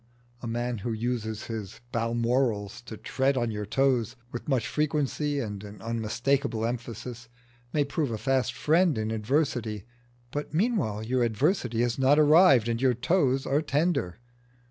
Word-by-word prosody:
A 120 - -5
man 120 0 -2
who 115 +4 -3
uses 110 -1 -3
his 110 -5 -6
balmorals 115 -2 0
to 110 -2 -8
tread 135 +4 0
on 120 -2 0
your 105 -1 -4
toes 125 -1 +1 0.2
with 120 - -6
much 130 -5 +1
frequency 150 -1 0
and 105 -5 -4
an 105 0 -10
unmistakeable 115 +3 -1
emphasis 120 0 -5 0.4
may 150 - +2
prove 145 0 -1
a 110 - -2
fast 130 0 0
friend 165 -2 +3
in 110 0 -1
adversity, 110 - -1 0.5
but 145 +1 -4
meanwhile 165 - 0
your 125 +2 0
adversity 120 - +1
has 120 +1 0
not 135 +2 +5
arrived 150 - +6
and 115 0 -1
your 130 -2 +3
toes 135 -1 +1
are 145 +2 +2
tender. 150 - 0
120 Hz, 150 wpm, -27 LUFS, 110-140 Hz, 0.5 s, arrived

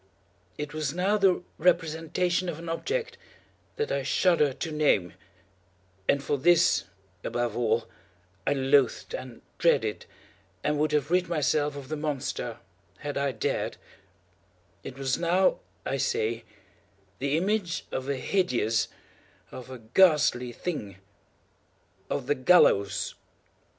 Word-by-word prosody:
It 150 0 -5
was 155 -1 -2
now 190 +4 +2
the 195 -4 +3 0.2
representation 175 +1 +1
of 160 - -4
an 165 0 -7
object 455 - -3 0.6
that 450 +2 -2
I - - 0
shudder 170 -6 +3
to 160 +5 -5
name—and 95 -4 -2
for 145 - -1
this, 175 +4 +4 0.4
above 120 -1 -2
all, 115 -1 +1 0.6
I - - +4
loathed, 135 -2 +2
and 125 -2 -7 0.2
dreaded, 115 -11 +2 0.6
and 150 0 0
would 155 0 +1
have 150 0 0
rid 180 0 +2
myself 150 -2 +1
of 140 -2 -8
the 155 - -2
monster 135 -5 -3 0.4
had 145 -1 -5
I 140 0 0
dared—it 110 - -2 1.2
was 135 -1 -1
now, 180 +2 +3 0.3
I 135 - -1
say, 115 -2 -1 0.7
the 140 +3 +1
image 190 -1 -1
of 130 +1 -3
a 140 - +1
hideous—of 125 - -3
a 130 - -7
ghastly 125 0 +3
thing—of 100 - -8
the 145 - +2
GALLOWS! 125 - +4
145 Hz, 115 wpm, -27 LUFS, 120-170 Hz, 1.2 s, this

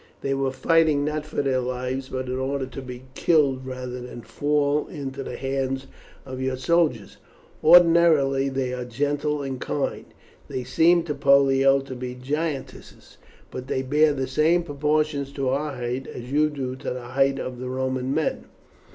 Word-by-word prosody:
They 135 - -1
were 135 0 0
fighting, 155 +1 +2
not 155 0 -3
for 155 - -2
their 130 -2 +1
lives, 130 +1 -3
but 130 0 -3
in 130 0 -3
order 135 0 -1
to 130 +1 -8
be 125 -1 -9
killed 135 -5 +2
rather 125 -1 -5
than 120 -1 -9
fall 145 0 0
into 140 -4 -6
the - - -6
hands 135 0 -2 0.4
of 130 -1 -6
your 130 0 -1
soldiers. 130 - +1 0.5
Ordinarily 160 -5 +5
they 130 -1 -2
are 125 -1 -3
gentle 145 +4 -1
and 135 -2 -5
kind. 140 - -2 0.4
They 130 - -4
seemed 165 +6 +3
to 150 - -2
Pollio 135 -1 +4
to 135 -1 -8
be 125 0 -6
giantesses, 145 +2 -5 0.3
but 130 - -7
they 130 - -1
bear 150 +3 +3
the 135 -2 -2
same 155 +6 +2
proportion 150 -1 0
to 135 -1 -3
our 140 +2 -1
height 125 +1 -4
as 125 +1 -8
you 150 +2 +3
do 130 -3 -4
to - - -5
the 125 -1 -6
height 135 +1 +2
of 130 -2 -5
the 125 0 -5
Roman 130 0 -2
men." 155 +2 -1
135 Hz, 170 wpm, -24 LUFS, 130-150 Hz, 0.5 s, Ordinarily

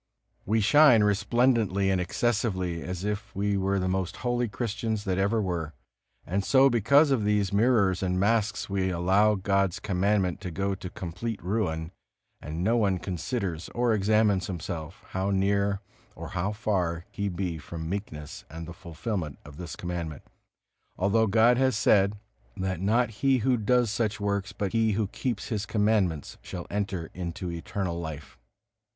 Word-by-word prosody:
We 110 +2 +2
shine 125 -1 +6
resplendently 105 -1 +2
and 95 -1 +1
excessively, 95 -3 -1
as 90 0 -5
if 105 0 -4
we 100 +1 0
were 100 0 +1
the 95 -1 0
most 95 -1 -1
holy 120 0 +1
Christians 110 0 -3
there 95 -2 -1
ever 100 +4 +2
were. 85 -6 -2 0.5
And 100 +2 -1
so 135 +4 +5
because 140 +6 +4
of 125 -6 +2
these 105 -2 +1
mirrors 100 -4 +3
and 90 -1 0
masks 105 +1 +1
we 95 -1 0
allow 95 +4 +3
God's 100 -2 +1
Commandment 95 -2 0
to 90 - -4
go 100 +3 -1
to 95 -1 -6
complete 95 +6 -5
ruin, 90 -5 -1 0.5
and 80 +3 -4
no 115 +5 +3
one 100 -5 +2
considers 90 -1 -3
or 120 -1 +2
examines 105 -2 +2
himself, 85 -2 -6
how 95 +1 -1
near 100 0 +1 0.3
or - - -7
how 95 +2 -1
far 90 -6 -1
he 100 0 -2
be 90 -3 -3
from 80 +2 -7
meekness 80 -6 -5
and 80 +1 -7
the 85 - -7
fulfilment 85 - -4
of 75 0 -12
this 85 -1 -6
Commandment; 85 -4 -5 0.7
although 105 +4 +2
God 115 +4 +5
has 130 -4 +2
said, 105 -2 +3 0.4
that 95 -2 -2
not 115 +4 +2
he 135 -1 +4
who 130 -1 +4
does 120 0 +2
such 110 0 -1
works, 100 -1 -1
but 100 -2 -3
he 110 -1 +2
who 105 +1 +1
keeps 120 -3 -3
His 105 -3 -2
Commandments, 105 -8 0
shall 90 -2 -7
enter 95 -5 -3
into 90 0 -5
eternal 85 +1 -3
life. 80 -3 -7
100 Hz, 160 wpm, -27 LUFS, 90-110 Hz, 0.7 s, shine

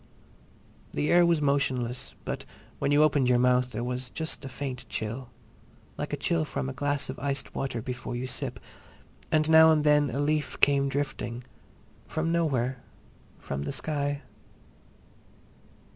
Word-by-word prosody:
The 150 - 0
air 175 0 +6
was 165 -3 +2
motionless, 130 -3 0
but - - -3 0.4
when 140 - +1
you 145 +1 +6
opened 140 -4 +3
your 125 - +5
mouth 125 0 +3
there 120 -1 -4
was 125 +1 -3
just 160 +4 -4
a 135 - -5
faint 130 0 -5
chill, 115 +4 -4 0.7
like - - -4
a - - -1
chill 80 -1 +1
from 70 -3 -3
a 65 - -4
glass 145 -1 -1
of - - -6
iced 140 -1 -2
water 120 -4 -3
before 125 -1 -4
you 125 +1 -3
sip, 130 - -3 0.7
and 155 -1 +3
now 160 0 +8
and 155 -1 +4
again 150 -1 +4
a 125 - -3
leaf 150 0 0
came 140 -1 +4
drifting—from 140 +4 -5
nowhere, 135 -7 +1 0.6
from 70 0 -5
the 70 - -3
sky. 145 -2 -2
135 Hz, 150 wpm, -28 LUFS, 125-150 Hz, 0.7 s, now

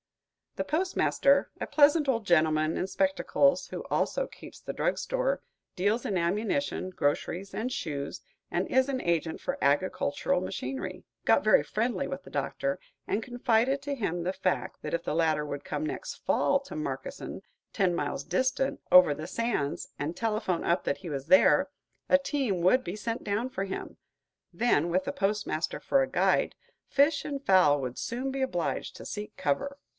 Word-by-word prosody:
The - - -1
postmaster 310 -4 +2
a - - -2
pleasant 295 0 +4
old 230 -4 +1
gentleman 155 -2 +3
in 185 - -1
spectacles, 280 +3 +2
who - - -6
also - - 0
keeps - - -13
the - - -6
drug - - 0
store, - - -1 0.4
deals 205 +6 +1
in 195 - 0
ammunition, 205 +5 -1
groceries, 180 +3 -2
and 245 +4 -2
shoes, 150 - -4 0.3
and - - -1
is 260 +1 +2
an 265 -2 -1
agent 170 -1 0
for 275 +1 -3
agricultural 185 +4 +1
machinery 135 -7 -5 0.2
got - - +4
very - - +5
friendly - - -1
with - - -5
the - - -12
Doctor, 140 0 -2 0.3
and 215 - 0
confided 245 +2 +1
to 285 0 -2
him 175 -8 -2
the 185 +2 -1
fact 185 -1 -2
that - - -5
if 170 0 0
the - - -2
latter 160 -2 +2
would 145 -1 -5
come 310 - -3
next - - -4
fall 280 - +2
to 280 +2 -10
Markesan, 310 +1 -5 0.3
ten 185 -4 +1
miles 145 -3 -2
distant, 260 - 0
over 180 -5 +8
the 155 +3 -6
sands, 190 -9 -2
and 155 +5 -3
telephone 215 -6 -1
up 170 +1 +2
that - - -1
he 185 -3 -8
was 140 0 -4
there, 275 - +5 0.4
a 275 - +7
team 275 - -1
would 220 +9 +4
be 175 - -4
sent 230 +3 -4
down 210 +5 -1
for 195 -6 -3
him; 190 - -6 0.5
then, 195 -9 +2
with 185 +2 +1
the 280 - -2
postmaster 205 - -1
for 275 - +2
a 265 - 0
guide, - - +2 0.3
fish 285 +2 +3
and 280 -2 -5
fowl 180 -7 +5
would 130 -2 -4
soon 255 +3 -3
be 270 0 -3
obliged 180 -11 -2
to - - -10
seek 210 0 -6
cover. 280 - -1
205 Hz, 175 wpm, -29 LUFS, 170-275 Hz, 0.5 s, over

